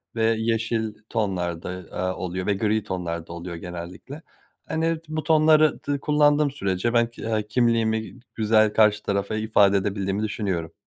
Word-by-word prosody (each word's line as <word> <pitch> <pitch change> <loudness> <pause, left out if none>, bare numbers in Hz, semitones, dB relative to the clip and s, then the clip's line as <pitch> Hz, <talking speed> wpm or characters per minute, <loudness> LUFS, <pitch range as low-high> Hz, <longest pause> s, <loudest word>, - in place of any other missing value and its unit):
ve 115 - 0
yeşil 115 -1 -1 0.2
tonlarda, 90 -7 -2 0.2
aaa, 95 0 -2
oluyor 95 +1 -4
ve 105 - +3
gri 105 +1 0
tonlarda 85 -4 -4
oluyor 85 0 -6
genellikle. 90 - -8 0.5
Hani, 165 +1 0
t 155 -1 -9
bu 155 - -2
tonları 155 -1 +4
dı 145 -1 -1
kullandığım 150 0 +3
sürece 100 -3 -1
ben 120 -1 +4
k - - -12
eee, 110 -2 -1
kimliğimi, 110 -1 +1 0.2
güzel 110 -1 +3
karşı 105 -1 +4
tarafa 100 +2 -1
ifade 105 -2 +3
edebildiğimi 100 +1 -1
düşünüyorum. 95 -6 -3
110 Hz, 150 wpm, -24 LUFS, 95-120 Hz, 0.5 s, tonları